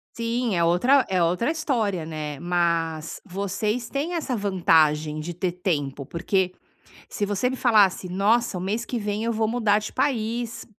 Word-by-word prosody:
Sim, 230 Hz, -1 st, -1 dB
é 170 Hz, -, +2 dB
outra 245 Hz, +12 st, +4 dB
é 185 Hz, -2 st, +2 dB
outra 180 Hz, +8 st, +1 dB
história, 225 Hz, -, -1 dB
né. 155 Hz, -2 st, -5 dB
Mas 170 Hz, -2 st, -1 dB
vocês 210 Hz, +4 st, -2 dB
têm 295 Hz, +5 st, -2 dB
essa 315 Hz, -7 st, -2 dB
vantagem 160 Hz, -7 st, +2 dB
de 170 Hz, +3 st, -5 dB
ter 180 Hz, +1 st, -2 dB
tempo, 145 Hz, -7 st, -2 dB
porque 180 Hz, +4 st, -1 dB, 0.6 s
se 205 Hz, -, -2 dB
você 205 Hz, +5 st, 0 dB
me 260 Hz, -, -3 dB
falasse: 210 Hz, -7 st, +3 dB
"Nossa, 205 Hz, +4 st, +2 dB
o -, -, -3 dB
mês 210 Hz, +6 st, -2 dB
que 245 Hz, -, -2 dB
vem 210 Hz, 0 st, -2 dB
eu 235 Hz, -, 0 dB
vou 220 Hz, 0 st, +1 dB
mudar 215 Hz, -2 st, +2 dB
de 210 Hz, -, -6 dB
país", 235 Hz, -3 st, -1 dB
200 Hz, 165 wpm, -24 LUFS, 170-230 Hz, 0.6 s, outra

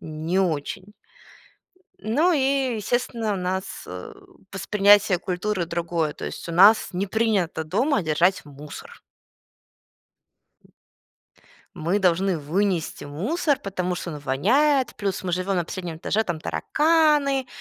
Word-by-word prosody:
не 160 Hz, +4 st, -2 dB
очень. 185 Hz, +3 st, -3 dB, 1.1 s
Ну, 300 Hz, +12 st, +2 dB
и, 270 Hz, -3 st, +1 dB
естественно, 230 Hz, 0 st, -1 dB
у -, -, -3 dB
нас, 185 Hz, +1 st, -4 dB
э, -, -, -8 dB, 0.4 s
восприятие 205 Hz, -2 st, +4 dB
культуры 185 Hz, 0 st, -2 dB
другое. 170 Hz, -2 st, -2 dB
То -, -, -8 dB
есть, -, -, -7 dB
у -, -, -4 dB
нас 200 Hz, +6 st, +6 dB
не 190 Hz, +3 st, -2 dB
принято 200 Hz, -6 st, 0 dB
дома 215 Hz, -, 0 dB
держать 170 Hz, +4 st, +1 dB
мусор. 145 Hz, 0 st, -11 dB, 2.7 s
Мы 170 Hz, +6 st, 0 dB
должны 185 Hz, -1 st, +1 dB
вынести 175 Hz, +3 st, -1 dB
мусор, 260 Hz, -, -1 dB
потому 185 Hz, -2 st, -3 dB
что 175 Hz, -1 st, -5 dB
он 150 Hz, -, -6 dB
воняет. 240 Hz, -, +2 dB
Плюс 195 Hz, -3 st, -3 dB
мы 180 Hz, -, -2 dB
живем 185 Hz, +2 st, -1 dB
на 175 Hz, -, 0 dB
последнем 175 Hz, -2 st, -6 dB
этаже, 210 Hz, +6 st, 0 dB
там 175 Hz, -6 st, -4 dB
тараканы. 295 Hz, -, +2 dB
190 Hz, 125 wpm, -24 LUFS, 170-225 Hz, 2.7 s, нас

